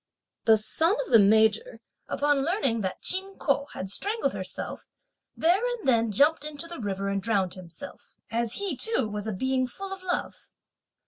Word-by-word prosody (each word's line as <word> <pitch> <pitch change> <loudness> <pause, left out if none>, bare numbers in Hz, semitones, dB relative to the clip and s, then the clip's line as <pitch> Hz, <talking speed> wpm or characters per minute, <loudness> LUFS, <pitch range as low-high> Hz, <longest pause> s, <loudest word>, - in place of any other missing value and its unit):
The 220 -1 +6
son 320 - +3
of - - -11
the 225 - +8
Major, 220 - +3 0.3
upon 290 -1 +1
learning 275 - 0
that 190 -2 -4
Chin 385 +1 0
Ko 280 -1 0
had 185 - -5
strangled 425 - -1
herself, - - -5 0.5
there 350 +5 +3
and 445 - -8
then 230 -3 +3
jumped 290 +8 +3
into 300 +1 -5
the 340 -3 -8
river 200 -1 -3
and 200 0 -1
drowned 195 -4 0
himself, 175 -3 -11 0.2
as 230 0 -1
he 395 -2 -2
too 445 - +1
was 210 0 -4
a - - -1
being 260 +5 0
full 390 +9 -7
of 385 - -8
love. 360 -1 -4
260 Hz, 175 wpm, -27 LUFS, 215-355 Hz, 0.5 s, the